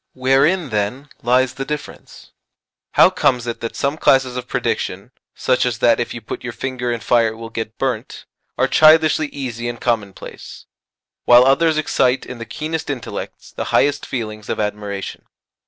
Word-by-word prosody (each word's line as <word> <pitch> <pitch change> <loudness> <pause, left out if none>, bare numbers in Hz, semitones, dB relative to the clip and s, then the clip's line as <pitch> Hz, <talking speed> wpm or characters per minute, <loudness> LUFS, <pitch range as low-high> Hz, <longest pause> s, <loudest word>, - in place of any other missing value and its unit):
Wherein, 135 +6 +2
then, 110 +7 -2
lies 125 +1 +2
the 135 +1 -4
difference? 150 +1 -8 0.6
How - - +6
comes 125 -2 +1
it 120 -1 -4
that 115 -1 -5
some 140 +2 -1
classes 130 -2 +3
of 125 0 -5
prediction 115 -3 -2 0.2
such 130 -1 +1
as 125 -2 -1
that 115 +1 +3
if 120 - -2
you 120 - -6
put 110 - -7
your 120 -2 -5
finger 125 -1 -3
in 120 -1 -3
fire 120 -2 +3
it 110 - -4
will 115 0 -9
get 110 -1 -5
burnt 130 -3 -3 0.3
are - - +2
childishly 155 0 +5
easy 120 -4 -5
and 120 -1 -6
commonplace, 110 -5 -4 0.6
while 120 +1 +7
others 155 +4 +3
excite 135 -4 +1
in 125 - -8
the 115 - -6
keenest 155 +5 -4
intellects 130 -5 -6
the - - -5
highest 145 0 +1
feelings 110 -4 -5
of - - -2
admiration? 105 -1 -4
125 Hz, 170 wpm, -19 LUFS, 115-135 Hz, 0.6 s, while